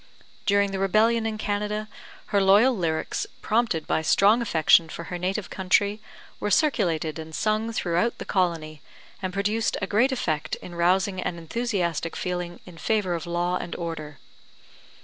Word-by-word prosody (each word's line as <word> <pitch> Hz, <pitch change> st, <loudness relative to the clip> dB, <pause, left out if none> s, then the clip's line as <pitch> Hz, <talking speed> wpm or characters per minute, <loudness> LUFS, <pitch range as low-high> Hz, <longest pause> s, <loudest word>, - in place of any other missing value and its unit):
During 200 Hz, 0 st, +3 dB
the 195 Hz, -, -3 dB
rebellion 220 Hz, +4 st, +3 dB
in 220 Hz, -1 st, -3 dB
Canada, 210 Hz, 0 st, -2 dB, 0.5 s
her 200 Hz, -, +4 dB
loyal 205 Hz, +7 st, +5 dB
lyrics, 165 Hz, -5 st, -2 dB, 0.2 s
prompted 215 Hz, -8 st, +1 dB
by -, -, 0 dB
strong 205 Hz, +8 st, +4 dB
affection 165 Hz, -5 st, +4 dB
for 170 Hz, -, -6 dB
her 175 Hz, -, -3 dB
native 190 Hz, +3 st, -2 dB
country, 200 Hz, +2 st, +1 dB, 0.4 s
were 210 Hz, -, -1 dB
circulated 175 Hz, -, +1 dB
and 160 Hz, 0 st, -7 dB
sung 215 Hz, +1 st, 0 dB
throughout 180 Hz, +1 st, 0 dB
the -, -, -7 dB
colony, 165 Hz, -5 st, -1 dB, 0.4 s
and 185 Hz, -1 st, -2 dB
produced 205 Hz, +4 st, 0 dB
a 190 Hz, -, -1 dB
great 230 Hz, +7 st, +2 dB
effect 155 Hz, -, -1 dB
in 175 Hz, -, -11 dB
rousing 185 Hz, +2 st, +1 dB
an 170 Hz, -, -3 dB
enthusiastic 170 Hz, -, -2 dB
feeling 180 Hz, -1 st, -4 dB
in 175 Hz, -3 st, -13 dB
favour 210 Hz, -4 st, 0 dB
of 170 Hz, -1 st, -4 dB
law 175 Hz, +1 st, 0 dB
and 175 Hz, -, -6 dB
order. 155 Hz, -4 st, -5 dB
190 Hz, 155 wpm, -25 LUFS, 170-215 Hz, 0.5 s, loyal